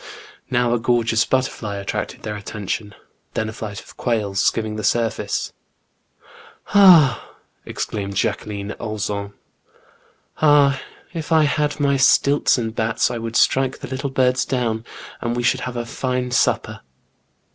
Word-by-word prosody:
Now 120 Hz, -2 st, +2 dB
a 120 Hz, -, +1 dB
gorgeous 115 Hz, -1 st, +2 dB
butterfly 125 Hz, -5 st, -1 dB
attracted 100 Hz, 0 st, -4 dB
their 105 Hz, -, -4 dB
attention, 105 Hz, 0 st, -5 dB, 0.4 s
then 110 Hz, 0 st, -1 dB
a -, -, -7 dB
flight 105 Hz, -2 st, -6 dB
of -, -, -17 dB
quails 105 Hz, -5 st, -1 dB
skimming 110 Hz, +2 st, 0 dB
the 110 Hz, -, -5 dB
surface. 110 Hz, -1 st, -1 dB, 1.2 s
Ah! 170 Hz, -, +6 dB, 0.3 s
exclaimed 100 Hz, -2 st, -4 dB
Jacquiline 105 Hz, -1 st, -2 dB
Auzun, 100 Hz, -2 st, -4 dB, 0.6 s
" -, -, -35 dB
ah, 145 Hz, -3 st, +5 dB, 0.3 s
if 165 Hz, -1 st, -6 dB
I 160 Hz, -1 st, +5 dB
had 150 Hz, 0 st, 0 dB
my 140 Hz, -1 st, +2 dB
^ -, -, -1 dB
stilts 140 Hz, +1 st, +4 dB
and 115 Hz, -2 st, -3 dB
bats, 115 Hz, +1 st, 0 dB
I 120 Hz, -, -3 dB
would 115 Hz, 0 st, -5 dB
strike 130 Hz, +1 st, +2 dB
the -, -, -8 dB
little 135 Hz, +2 st, -3 dB
birds 130 Hz, -1 st, +2 dB
down, 115 Hz, -3 st, -2 dB, 0.4 s
and 120 Hz, 0 st, -2 dB
we 120 Hz, -, -2 dB
should 130 Hz, +1 st, +2 dB
have 125 Hz, -, -7 dB
a 120 Hz, -, -3 dB
fine 125 Hz, +1 st, -2 dB
supper." 125 Hz, -, 0 dB
120 Hz, 145 wpm, -21 LUFS, 110-130 Hz, 1.2 s, Ah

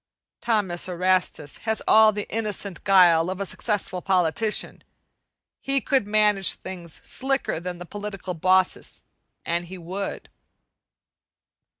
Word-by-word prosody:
Thomas 190 Hz, -6 st, 0 dB
Erastus 180 Hz, -4 st, -1 dB
has 220 Hz, 0 st, -1 dB
all 220 Hz, 0 st, +7 dB
the 210 Hz, -1 st, -5 dB
innocent 210 Hz, -4 st, -4 dB
guile 180 Hz, -3 st, +5 dB
of 190 Hz, +1 st, -4 dB
a 200 Hz, -, -2 dB
successful 195 Hz, -2 st, -2 dB
politician. 190 Hz, +3 st, 0 dB, 0.8 s
He 275 Hz, 0 st, 0 dB
could 265 Hz, -6 st, 0 dB
manage 210 Hz, -2 st, +3 dB
things 175 Hz, -4 st, -8 dB
slicker 270 Hz, -9 st, -1 dB
than 180 Hz, +1 st, -6 dB
the 175 Hz, -, -8 dB
political 195 Hz, -1 st, -6 dB
bosses, 185 Hz, +2 st, +1 dB, 0.4 s
an' 170 Hz, +1 st, -1 dB
he 185 Hz, +2 st, -9 dB
would. 185 Hz, +3 st, -6 dB
190 Hz, 115 wpm, -24 LUFS, 180-210 Hz, 0.8 s, all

